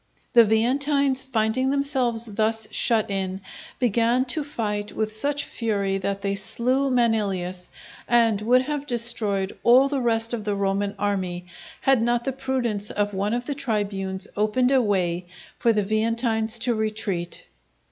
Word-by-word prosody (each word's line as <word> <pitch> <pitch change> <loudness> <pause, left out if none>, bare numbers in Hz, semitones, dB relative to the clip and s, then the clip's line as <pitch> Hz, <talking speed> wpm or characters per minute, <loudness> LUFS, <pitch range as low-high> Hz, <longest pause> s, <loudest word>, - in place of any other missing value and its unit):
The 235 -2 +8
Veientines 265 +5 +2
finding 255 0 0
themselves 265 -5 0
thus 220 0 -1
shut 220 -3 +1
in, 190 -1 -2 0.4
began 240 +1 +2
to 310 - -2
fight 210 -7 -4
with 215 0 -2
such 285 +5 0
fury 200 -4 -2
that 200 +1 -3
they 200 0 0
slew 250 +7 0
Manilius, 200 -7 0 0.4
and 230 -3 +3
would 250 +4 +3
have 290 +1 -4
destroyed 220 -5 0
all 255 +3 +6
the 275 -2 -1
rest 230 -1 0
of 225 -3 -3
the 205 -1 -1
Roman 200 0 -1
army, 185 -3 -2 0.4
had 270 -3 +3
not 240 +1 +1
the 270 - -2
prudence 245 -6 -1
of 205 0 -1
one 200 +4 -1
of 245 0 -3
the 285 - -2
tribunes 200 -7 -2
opened 215 +5 +1
a 265 -2 +4
way 180 -5 -1 0.3
for 235 - +3
the 210 -2 +1
Veientines 225 +1 0
to 245 0 +3
retreat. 215 -5 -3
225 Hz, 150 wpm, -24 LUFS, 205-250 Hz, 0.4 s, The